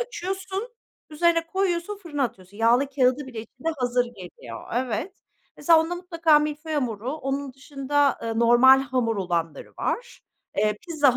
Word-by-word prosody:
açıyorsun, 385 -2 -4 0.4
üzerine 330 +2 +2
koyuyorsun, 380 +2 -1
fırına 295 -5 -3
atıyorsun. 195 -4 -8
Yağlı 235 +5 +3
kağıdı 265 0 +2
bile 240 -4 -6
içinde 255 +7 -7
hazır 245 -1 +1
geliyor. 180 - -10
Evet. 255 - -2 0.4
Mesela 330 -2 +5
onda 330 +2 -2
mutlaka 335 -3 +3
milföy 300 +1 -3
hamuru, 245 -3 -2
onun 275 -2 -3
dışında, 275 +1 0
ııı, 225 -1 -2
normal 240 +3 +7
hamur 250 -4 -1
olanları 170 -4 -3
var. 485 0 -3 0.4
Eee, 210 0 +2
pizza 290 -6 +3
270 Hz, 140 wpm, -25 LUFS, 235-330 Hz, 0.4 s, normal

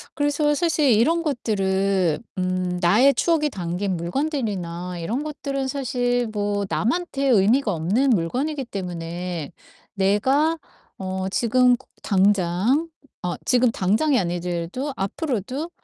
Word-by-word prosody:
그래서 295 0 +1
사실 310 -5 +2
이런 320 +11 +3
것들은 195 - 0 0.2
음 185 -1 -1
나의 230 +11 +5
추억이 315 -3 +1
담긴 180 -1 -3
물건들이나 180 - -3
이런 235 - -2
것들은 275 -2 -3
사실 245 -2 0
뭐 205 -1 -1
남한테 275 +2 -1
의미가 225 +1 +3
없는 200 - +1
물건이기 255 - -1
때문에 175 - -5 0.4
'내가 260 +12 +2 0.4
어 190 0 -3
지금 250 +2 +3
그 265 - -21 0.2
당장 200 - +2 0.3
어 175 -1 -1
지금 250 -2 +3
당장이 225 +10 +2
아니더라도 175 - -3
앞으로도 255 - -3
215 Hz, 260 characters per minute, -23 LUFS, 185-275 Hz, 0.4 s, 나의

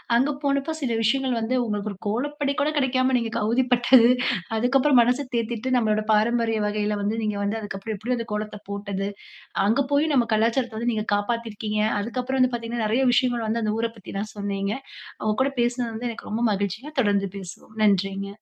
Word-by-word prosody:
அங்க 270 +5 +3
போனப்ப 280 +3 0
சில 235 -4 0
விஷயங்கள் 260 +3 +1
வந்து 225 +3 -1
உங்களுக்கு 210 -2 -2
ஒரு 200 - -9
கோலப்பொடி 280 +6 -1
கூட 290 - +2
கெடைக்காம 260 -1 +2
நீங்க 230 -1 -2
அவதிப்பட்டது. 245 +1 +4 0.5
அதுக்கப்புறம் 260 +3 +4
மனச 250 +4 +1
தேத்திட்டு, 235 +2 -1
நம்பளோட 215 -2 +1
பாரம்பரிய 225 0 +2
வகையில 210 0 -1
வந்து 210 +3 -1
நீங்க 210 -1 -1
வந்து 210 +2 -1
அதுக்கப்புறம் 205 +1 -5
எப்படி 245 +5 -1
அந்த 230 - -4
கோலத்தை 210 0 -4
போட்டது. 200 -1 -3 0.6
அங்க 225 +7 +3
போயும் 295 +1 +3
நம்ம 240 -3 +3
கலாச்சாரத்த 230 +1 +1
வந்து 235 +1 0
நீங்க 215 0 -2
காப்பாத்தியிருக்கீங்க. 215 0 -2 0.2
அதுக்கப்புறம் 255 +4 -2
வந்து 255 0 +4
பாத்தீங்கன்னா, 230 -1 -3
நெறைய 235 +5 +2
விஷயங்கள் 245 -3 +1
வந்து, 230 +1 0
அந்த 215 0 0
ஊரைப் 230 0 -2
பத்தில்லாம் 200 +2 -6
சொன்னீங்க. 200 0 -2 0.5
உங்க 215 0 +2
கூட 275 - +1
பேசினது 240 -1 0
வந்து 240 +2 -3
எனக்கு 230 - -9
ரொம்ப 220 +2 -2
மகிழ்ச்சிங்க, 205 - -3
தொடர்ந்து 200 -3 +1
பேசுவோம். 195 +3 -11
நன்றிங்க. 195 0 +1
230 Hz, 175 wpm, -24 LUFS, 210-250 Hz, 0.6 s, அவதிப்பட்டது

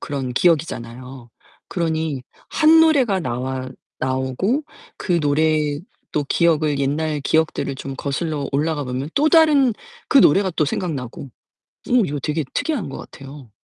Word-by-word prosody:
그런 135 -4 -4
기억이잖아요. 130 -6 -1 0.4
그러니 160 -5 -2 0.3
1 320 +1 +5
노래가 265 - +3
나와 130 0 -4 0.3
나오고 130 - -1 0.4
그 175 -3 0
노래 150 0 +1 0.3
또 150 -1 -1
기억을, 155 -2 +2
옛날 150 +2 -1
기억들을 155 -2 0
좀 135 0 -6
거슬러 145 0 -3
올라가 150 0 0
보면 130 +3 -4
또 300 +2 +3
다른 295 -6 +5 0.4
그 275 - +5
노래가 195 - +5
또 155 - +3
생각나고 140 -5 -4 0.6
어 - - 0
이거 145 -2 -3
되게 150 +2 -1
특이한 290 - -2
것 135 - -7
같아요. 135 -3 -11
150 Hz, 285 characters per minute, -21 LUFS, 135-175 Hz, 0.6 s, 1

